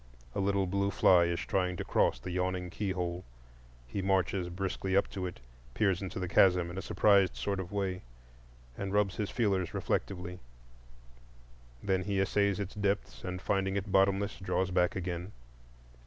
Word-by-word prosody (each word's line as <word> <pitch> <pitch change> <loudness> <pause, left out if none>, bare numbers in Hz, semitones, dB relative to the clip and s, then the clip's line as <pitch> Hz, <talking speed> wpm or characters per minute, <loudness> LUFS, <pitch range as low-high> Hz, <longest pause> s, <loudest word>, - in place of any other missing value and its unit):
A - - -2
little 100 0 +1
blue 100 +2 0
fly 90 -3 +5
is 85 0 -1
trying 90 -2 0
to - - -3
cross - - +2
the 90 - -6
yawning 90 0 -2
keyhole. 90 -3 -2 0.6
He - - -4
marches 95 -1 +1
briskly 95 +1 -1
up 100 - +3
to 95 -2 -3
it, 90 - -8 0.4
peers 95 -3 +2
into 95 - -5
the 90 - -2
chasm 90 -1 +4
in 90 - -8
a - - -3
surprised 100 -2 +3
sort 100 -1 -2
of 95 -1 -5
way, 95 -3 -2 0.7
and 95 0 -4
rubs 105 -2 +1
his 105 -2 -1
feelers 95 -7 0
reflectively; 90 -1 -2 1.4
then 95 -1 0
he 100 -1 0
essays 100 0 +2
its 100 -1 -4
depths, 100 -1 -2
and, 90 0 -5
finding 95 0 0
it 100 0 -3
bottomless, 100 +1 +2
draws 95 0 -1
back 90 -1 +2
again. 90 +1 -4
95 Hz, 165 wpm, -31 LUFS, 90-100 Hz, 1.4 s, fly